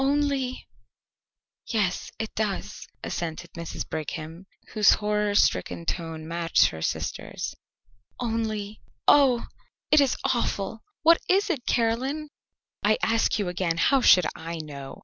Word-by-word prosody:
"Only 275 -2 0 0.5
" - - -47
"Yes, 195 -4 0
it 220 - -4
does," 210 -3 -3 0.2
assented 170 0 -4
Mrs. 170 -1 -5
Brigham, 160 +3 -6 0.2
whose 210 -2 +5
horror 210 0 0
stricken 90 - +2
tone 160 - -4
matched 170 0 +3
her 80 - -8
sister's, - - -3 0.7
"only 220 -3 -3 0.3
Oh, 265 -5 +5 0.5
it 305 - +7
is 275 -3 +2
awful! 220 -3 -1 0.2
What 335 +1 +6
is 390 +1 +3
it, 270 -7 -4
Caroline?" 260 +6 0 0.5
"I - - +4
ask 225 0 +2
you 205 -3 -1
again, 180 -2 -1
how 270 +10 +4
should 180 -7 +7
I 165 +1 -6
know?" 140 -3 -8
210 Hz, 130 wpm, -26 LUFS, 170-250 Hz, 0.7 s, it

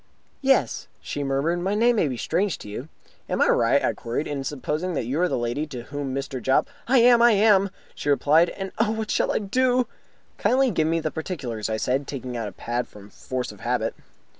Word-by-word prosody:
"Yes," 270 0 +2
she 145 - -4
murmured. 140 +6 0
"My 190 +3 -1
name 235 +2 +3
will 155 - +2
be 125 - -4
strange 180 - 0
to - - -11
you." 120 +9 -7 0.4
"Am - - -1
I - - +4
right," - - +3
I - - +1
queried, 120 +6 -3
"in 140 -2 -3
supposing 150 +5 -3
that 130 - -1
you 135 +8 -1
are 180 - +4
the - - -1
lady 120 +6 -2
to 125 -5 -7
whom 140 0 -5
Mr. 135 -2 -4
Jopp 130 +2 +2
" - - -31
"I 265 +2 +4
am! 240 0 +6
I 240 -1 +7
am!" 200 -1 +4 0.2
she 145 - -4
replied. 155 +4 +4
"And, 195 -1 -6
oh, - - +3
what 220 -1 -3
shall - - +1
I - - +1
do?" 250 +4 +2 0.5
"Kindly 260 0 +3
give 160 -5 +1
me 165 +1 +1
particulars," 150 - -4
I 110 - -1
said, 130 +5 -1
taking 130 -3 -5
out 115 -2 -2
my 100 - -11
pad 120 +1 -1
from 105 0 -14
force 130 -2 -4
of 105 - -14
habit. 120 -2 -1
150 Hz, 220 wpm, -24 LUFS, 125-200 Hz, 0.5 s, I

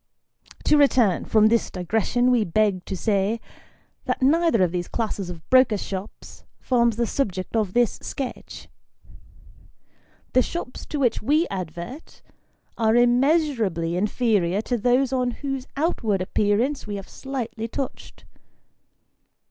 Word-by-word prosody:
To 300 - +4
return 245 - +3
from 215 -1 +4
this 230 0 +1
digression, 220 +7 0
we 240 -3 +3
beg 200 0 0
to 190 - -4
say, 205 +3 0 0.7
that - - -1
neither 310 - +3
of 175 - +1
these 175 -1 -3
classes 210 -5 -3
of 170 -2 -9
brokers' 255 -6 +4
shops, 195 +1 -8 0.2
forms 235 -3 +2
the 235 +1 0
subject 200 -6 -3
of 210 -5 0
this 240 -3 +1
sketch. 270 -3 -6 1.7
The 255 - +5
shops 295 -3 -5
to 295 - -3
which 250 -4 +1
we 300 +9 +2
advert, 185 - -7 0.6
are 220 0 +3
immeasurably 240 - +2
inferior 205 -2 +1
to 245 - -1
those 250 +3 +2
on 250 -1 +1 0.2
whose 270 -1 -3
out 325 +5 0
ward 200 -4 0
appearance 215 +8 0
we 205 - -4
have 195 -1 -7
slightly 240 -4 -5
touched. 265 +3 -6
230 Hz, 130 wpm, -24 LUFS, 195-255 Hz, 1.7 s, The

